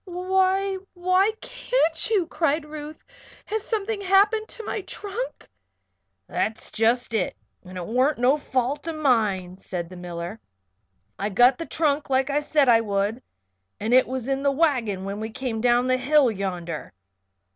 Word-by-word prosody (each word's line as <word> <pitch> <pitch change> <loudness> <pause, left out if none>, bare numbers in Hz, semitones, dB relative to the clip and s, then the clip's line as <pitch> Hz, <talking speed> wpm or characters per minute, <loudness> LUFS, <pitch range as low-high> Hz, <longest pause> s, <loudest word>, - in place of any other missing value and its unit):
"Why 380 +1 +1 0.2
why 370 +4 +2
can't - - 0
you?" 405 -6 +2
cried 315 -2 0
Ruth. 300 0 -9 0.4
"Has 435 +1 -2
something 425 -1 -2
happened 410 +3 +3
to 455 - -9
my 425 - -3
trunk?" 415 +6 -6 0.8
"That's 220 0 -2
jest 230 +2 +1
it 205 -5 -1 0.3
and 185 0 -10
it 175 - -4
warn't 255 - +2
no 250 +4 +4
fault 280 +1 -2
o' 330 - -2
mine," 215 - +1
said 175 -3 -5
the 185 - -10
miller. 175 +3 -6 0.8
"I 200 - -1
got 245 +5 +4
the 330 - -5
trunk 300 -2 0
like 265 +1 +2
I 290 - +2
said 295 -1 +2
I 230 -2 +6
would 205 +2 -1 0.6
and 220 +3 -1
it 255 0 +6
was 255 -1 -4
in 270 0 0
the 280 - +3
wagon 250 - +1
when 200 +1 -4
we 220 +1 -4
came 225 -1 -4
down 245 +1 +3
the 255 0 +2
hill 275 -1 +4
yonder. 180 -5 -5
265 Hz, 160 wpm, -24 LUFS, 220-350 Hz, 0.8 s, I